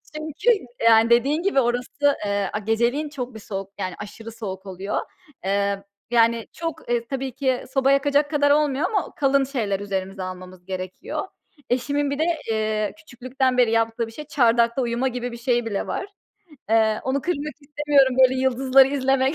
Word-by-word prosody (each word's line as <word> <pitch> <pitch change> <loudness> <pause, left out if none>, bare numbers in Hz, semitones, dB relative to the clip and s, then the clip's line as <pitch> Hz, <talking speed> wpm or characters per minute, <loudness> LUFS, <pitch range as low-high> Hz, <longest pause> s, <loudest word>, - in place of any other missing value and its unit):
Çünkü 315 - +1 0.3
yani 225 0 +6
dediğin 275 +8 +3
gibi 390 -9 +2
orası, 250 +4 +1
eee, 200 -1 0
a 210 - -1
geceleyin 235 +8 0
çok 255 -4 -6
bir - - -7
soğuk 195 -2 -6
yani 185 -2 -3
aşırı 225 +2 -8
soğuk 195 -4 -7
oluyor. 190 +1 -3 0.5
Eee, 200 0 0 0.3
yani 230 -1 +3
çok, 330 -5 -6
eee, 235 -1 0
tabii 270 -1 -3
ki 260 -3 0
soba 270 0 +3
yakacak 285 +1 +2
kadar 285 -1 +3
olmuyor 295 +1 +2
ama 405 -4 -2
kalın 275 -1 +3
şeyler 220 -8 -2
üzerimize 195 -1 -4
almamız 185 -1 -9
gerekiyor. 185 -1 -5 0.4
Eşimin 285 +3 0
bir 285 - -3
de, - - +3 0.3
eee, 215 -1 -1
küçüklükten 255 -3 -2
beri 240 -3 +4
yaptığı 225 0 +1
bir - - -11
şey 300 +6 -9
çardakta 235 -3 +3
uyuma 240 +2 0
gibi 245 -1 -3
bir 235 - -7
şeyi 240 -1 0
bile 205 -3 -3
var. 390 - -3 0.7
Eee, 220 -1 +3
onu 270 +2 0
kırmak 305 -4 -2
istemiyorum 285 -2 +2
böyle 260 0 +5
yıldızları 265 +1 +4
izlemek 270 +1 +1
245 Hz, 170 wpm, -23 LUFS, 220-280 Hz, 0.7 s, yani